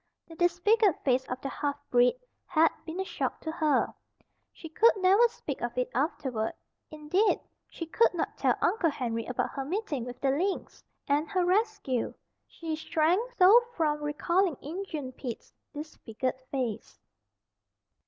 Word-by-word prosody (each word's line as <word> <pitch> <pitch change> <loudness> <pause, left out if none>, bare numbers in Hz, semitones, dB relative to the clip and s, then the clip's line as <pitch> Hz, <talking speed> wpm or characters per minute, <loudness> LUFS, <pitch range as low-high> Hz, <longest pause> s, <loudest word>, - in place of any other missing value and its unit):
The 330 - -12
disfigured 355 +4 +3
face 260 -1 +2
of 250 - -3
the 275 - -3
half 285 +1 -2
breed 245 - +5 0.3
HAD 320 -1 +4 0.2
been 325 +3 -5
a 380 - -1
shock - - -3
to 320 - -3
her. 310 -2 +1 0.6
She 325 - -10
could 445 +9 +5
never 395 +5 +5
speak 290 - -7
of 240 +1 -3
it 250 - 0
afterward. 255 -5 -1 0.4
Indeed, 310 +8 +1 0.3
she 335 - -6
could 450 +8 +3
not 335 - -2
tell - - +2
Uncle 375 -7 +3
Henry 230 -5 -3
about 250 - -1
her 275 - -4
meeting 315 - -2
with 245 0 -8
the 270 - +2
lynx, 370 +8 -2 0.2
and 290 +2 +1
her 370 -3 +1
rescue 385 - 0 0.3
she 325 -2 -5
shrank 335 +9 +1
so 400 +6 +8
from 300 -2 0
recalling 340 +2 +1
Injun 310 -4 -5
Pete's 250 -2 -7 0.2
disfigured 260 -4 -5
face. 245 -6 -3
310 Hz, 150 wpm, -29 LUFS, 265-370 Hz, 0.6 s, so